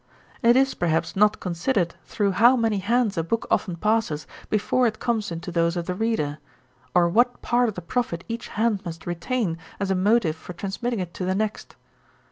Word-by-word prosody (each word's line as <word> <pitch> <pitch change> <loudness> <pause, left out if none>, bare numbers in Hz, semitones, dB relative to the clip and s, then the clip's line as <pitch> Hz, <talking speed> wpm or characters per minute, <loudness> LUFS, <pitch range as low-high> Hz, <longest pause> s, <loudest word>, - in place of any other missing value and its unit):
'It 235 0 +5
is, 270 +1 +3
perhaps, 165 -1 0
not 210 +2 +3
considered 175 +1 0
through 205 -3 0
how 235 +7 +6
many 225 -4 +1
hands 215 -1 +1
a - - 0
book 225 +8 -1
often 180 -4 +1
passes, 210 -5 0 0.2
before 235 +4 +2
it 215 -1 -2
comes 220 -5 -1
into 170 +2 -5
those 170 +1 +1
of 170 - -2
the 180 - -2
reader; 180 -8 -1 0.6
or 175 -1 +5
what 240 +8 +2
part 240 0 +2
of 210 - -7
the 180 - -5
profit 185 -4 -2
each 230 0 -5
hand 220 -2 0
must 165 -3 -7
retain, 175 +1 -2 0.2
as 200 -1 -1
a - - +2
motive 190 -3 +2
for 165 +2 -10
transmitting 210 +6 -3
it 175 -2 -4
to - - -5
the 185 +1 0
next. 215 +1 -3
200 Hz, 195 wpm, -24 LUFS, 170-230 Hz, 0.6 s, how